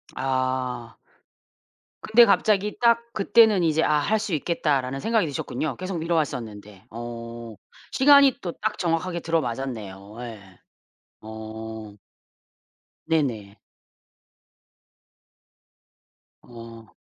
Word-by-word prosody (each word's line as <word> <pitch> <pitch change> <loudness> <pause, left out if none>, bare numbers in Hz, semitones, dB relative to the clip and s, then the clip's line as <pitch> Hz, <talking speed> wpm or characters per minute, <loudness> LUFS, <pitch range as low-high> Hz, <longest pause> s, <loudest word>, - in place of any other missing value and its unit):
아. 130 -3 -2 1.0
근데 235 +2 +6
갑자기 210 -2 +2
딱 235 0 +4
그때는 210 -1 +4
이제 160 -1 +2
'아 150 -1 +3
할 215 +9 +1
수 210 -4 -4
있겠다.'라는 140 -4 -1
생각이 225 +2 +1
드셨군요. 145 +1 -3
계속 185 -1 -4
미뤄왔었는데. 115 - -3
어 115 0 -8 0.4
시간이 280 -1 +6
또 175 - -4
딱 215 0 -1
정확하게 170 0 -1
들어맞았네요. 115 - -4
예. 100 -6 -10 0.6
어. 110 0 -8 1.1
네네. 115 -11 -2 2.8
어. 115 -2 -13
135 Hz, 195 characters per minute, -24 LUFS, 115-180 Hz, 2.8 s, 근데